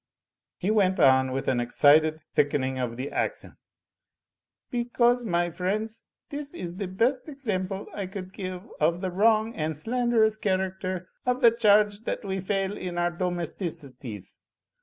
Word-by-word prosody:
He 200 - 0
went 190 -3 +3
on 130 -2 +5
with 135 +1 -3
an 125 - +2
excited 155 +5 +4
thickening 135 -3 +1
of 120 -2 -3
the 130 +3 -4
accent. - - -2 1.2
"Because, 240 0 +2
my 175 -3 +1
friends, 215 +6 -2 0.3
this 290 +2 -5
is 175 - -6
the 200 -2 -3
best 240 - 0
example 200 -9 -3
I 200 -2 -4
could 190 0 -7
give 185 -2 -5 0.2
of 170 +3 +2
the 185 -2 -2
wrong 220 +3 +3
and 155 -4 -2
slanderous 225 +2 +2
character 185 -2 -2 0.2
of 250 +1 0
the 235 -2 +8
charge 210 -2 +4
that 250 - -3
we 190 -1 -2
fail 195 +1 -1
in 180 -3 -5
our 175 0 +1
domesticities. 165 - -5
185 Hz, 145 wpm, -27 LUFS, 165-220 Hz, 1.2 s, the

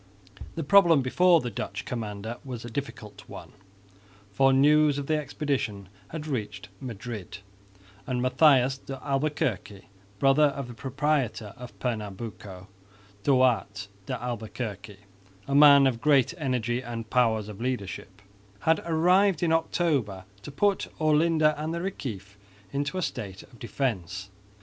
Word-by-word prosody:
The 165 - -3
problem 170 -3 +5
before 170 +6 +4
the 120 - -4
Dutch 100 0 -5
commander 110 -1 -5
was 125 -4 -7
a 120 - -8
difficult 110 -5 -6
one, - - -10 0.8
for 135 +3 +4
news 145 +2 +4
of 140 - -3
the 155 - +1
expedition 135 -9 -3 0.2
had 155 -1 -7
reached 110 -9 -4
Madrid; 115 -5 -7 0.7
and 125 -1 -1
Matthias 135 0 +4
de 135 -1 -8
Albuquerque, 135 -9 -2 0.3
brother 135 +5 +4
of 140 -2 -2
"the 120 - -9
proprietor" 135 -4 -1
of 125 -1 -11
Pernambuco, 105 -4 -5 0.5
Duarte 110 -6 +1 0.2
de 125 -2 -3
Albuquerque, 110 -4 -6 0.5
a 140 - -2
man 140 -1 +8
of 120 -3 0
great 140 -1 +3
energy 125 -4 -1
and 115 -2 -7
powers 115 -4 +2
of 105 0 -9
leadership, 100 -5 -5 0.4
had 160 -1 +2
arrived 180 +2 +3
in 165 - +2
October 145 - 0 0.2
to - - -9
put 200 +8 +1
Olinda 155 0 +3
and 160 +2 -3
the - - -3
Reciff 105 - -6 0.4
into 145 +6 -2
a 185 - -1
state 100 -8 -5
of 120 - -19
defence. 95 - -3
130 Hz, 135 wpm, -27 LUFS, 110-150 Hz, 0.8 s, man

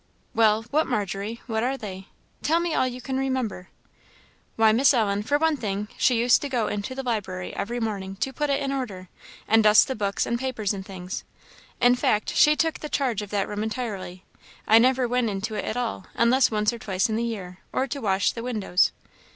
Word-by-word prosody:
"Well, 220 0 +3
what, 310 +2 +2
Margery? 210 0 -3
what 220 -2 -1
are 260 +3 0
they? 195 -5 -8 0.3
Tell 325 +3 +2
me 340 -1 -1
all 260 - +2
you 250 0 -6
can 265 +1 -3
remember." 260 -8 -2 0.9
"Why, 220 -1 +5
Miss 260 +5 +4
Ellen 205 -3 +1
for 285 +7 +1
one 320 0 +2
thing 205 -2 -3
she 250 -3 +3
used 235 +1 +4
to 285 - -4
go 245 -4 0
into 210 +5 -3
the 270 - -4
library 190 -7 -3
every 235 +5 -3
morning, 200 -4 -3
to 265 +7 -3
put 295 +3 -1
it 280 0 +1
in 275 - -1
order, 205 -10 -4 0.4
and 225 0 +5
dust 210 0 +6
the 265 - -1
books 200 -4 -1
and 235 0 -1
papers 240 -6 -2
and 195 -1 -5
things; 185 -1 -6 0.6
in 245 0 +5
fact, 215 -4 0
she 300 0 +5
took 325 +1 0
the 300 - -6
charge 250 -8 0
of 205 - -7
that 200 -1 -1
room 205 0 -4
entirely: 210 -5 -5 0.4
I 220 +1 +7
never 255 +1 +3
went 245 -1 +1
into 205 +2 -3
it - - -3
at 225 - -3
all, 230 -6 -3
unless 245 +2 +4
once 210 +1 +1
or 235 - -7
twice 190 -3 0
in 220 - -2
the 230 - 0
year, 190 -6 -5
or 260 - 0
to 275 +1 -5
wash 195 -3 +2
the 230 - -7
windows." 215 -7 +1
225 Hz, 215 wpm, -25 LUFS, 205-255 Hz, 0.9 s, I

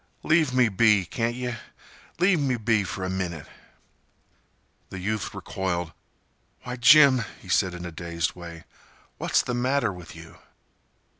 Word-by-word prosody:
"Leave 155 -3 +3
me 125 -2 +3
be, 105 -1 +3
can't 115 +5 -2
yeh? 125 -1 -4 0.6
Leave 180 0 +3
me 135 -4 0
be 110 -2 +1
for 95 +1 -5
a - - -2
minnit." 90 -5 -4 1.4
The 95 - -8
youth 105 +3 -3
recoiled. 90 -4 -3 0.7
"Why, 125 0 -5
Jim," 130 0 +6 0.2
he - - -15
said, 90 -2 +1
in 90 0 -7
a 85 - -6
dazed 85 0 -3
way, 85 -2 -10 0.6
"what's - - +1
the 125 - -3
matter 125 -3 0
with 90 -2 -11
you?" 80 0 -13
105 Hz, 145 wpm, -25 LUFS, 90-125 Hz, 1.4 s, Jim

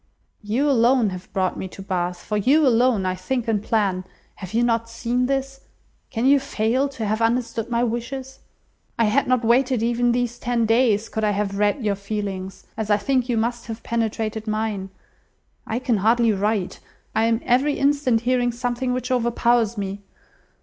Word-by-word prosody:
You 230 +7 0
alone 240 -4 +3
have 185 0 -9
brought 185 -2 -1
me 190 - -4
to 190 - -11
Bath. 180 -2 -2
For 210 - -3
you 275 +9 +4
alone, 240 -5 +3
I 185 - 0
think 230 +7 -3
and 215 -3 +1
plan. 200 -4 0 0.3
Have 185 -2 -8
you 230 +2 +2
not 230 -1 +1
seen 240 +2 -1
this? 270 0 -2 0.5
Can 230 +1 -2
you 280 +1 +6
fail 260 +1 0
to 235 -5 -5
have 215 +2 -1
understood 230 0 0
my 235 0 +1
wishes? 255 +3 -4 0.6
I 230 - +3
had 220 +7 +2
not 255 -2 +2
waited 250 0 +3
even 240 +1 +2
these 240 0 -1
ten 240 -2 0
days, 225 -2 +2
could 220 - -4
I 210 - +3
have 200 -1 -1
read 210 +5 +1
your 205 - +2
feelings, 195 -2 -5
as 220 -1 -4
I 205 - +4
think 255 +4 0
you 235 - +1
must 235 +2 -2
have 225 0 -7
penetrated 220 -1 -2
mine. 215 -3 -2 0.8
I 220 - -1
can 245 -3 0
hardly 230 +3 +3
write. 205 -1 -1 0.3
I 220 +1 +2
am 230 0 +2
every 265 +4 +2
instant 275 -5 +2
hearing 245 0 +1
something 245 +1 -2
which 250 +1 -3
overpowers 235 -2 +2
me. 200 0 -4
230 Hz, 180 wpm, -23 LUFS, 210-250 Hz, 0.8 s, you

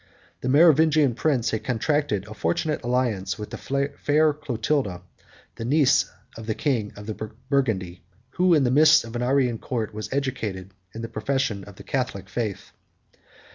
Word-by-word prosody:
The 130 - -3
Merovingian 155 -2 +5
prince 125 -3 0
had 110 - -2
contracted 130 -3 0
a 105 - -9
fortunate 110 - -1
alliance 120 -6 0
with 105 -1 -7
the 140 +1 -2
fair 150 +1 +3
Clotilda, 120 -8 -2 0.5
the - - -5
niece 140 +2 +3 0.3
of 115 -1 -9
the 110 - -1
king 120 -8 -1
of 105 - -10 0.4
Burgundy, 105 -11 0 0.3
who, 180 +1 +3
in 150 - +3
the 125 - +2
midst 155 +3 +6
of 115 +1 -9
an 120 - -2
Arian 125 -2 +1
court, 115 -5 -3
was 110 0 -6
educated 115 -9 -3 0.2
in 115 - -6
the - - -3
profession 135 -6 -2
of 100 - -12
the - - -12
Catholic 125 -8 -3
faith. 110 -5 -4
125 Hz, 160 wpm, -24 LUFS, 110-145 Hz, 0.5 s, midst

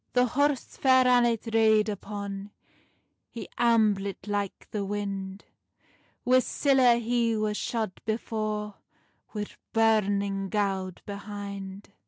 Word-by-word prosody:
The 250 0 +4
horse 280 +2 0
Fair 260 -1 +5
Annet 240 -2 +3
rade 220 -1 +4
upon, 200 -1 -5 0.8
He 230 - -8
amblit 215 -4 +2
like 205 -1 -3
the 210 -2 -2
wind; 195 -1 -4 0.8
Wi 255 +1 +5
siller 255 -2 +3
he 235 -1 +1
was 215 -1 -1
shod 220 -4 -3
before, 215 -1 -3 0.6
Wi 210 0 -2 0.3
burning 200 -3 +2
gowd 190 -3 -2
behind. 200 -1 -7
210 Hz, 105 wpm, -27 LUFS, 200-235 Hz, 0.8 s, Fair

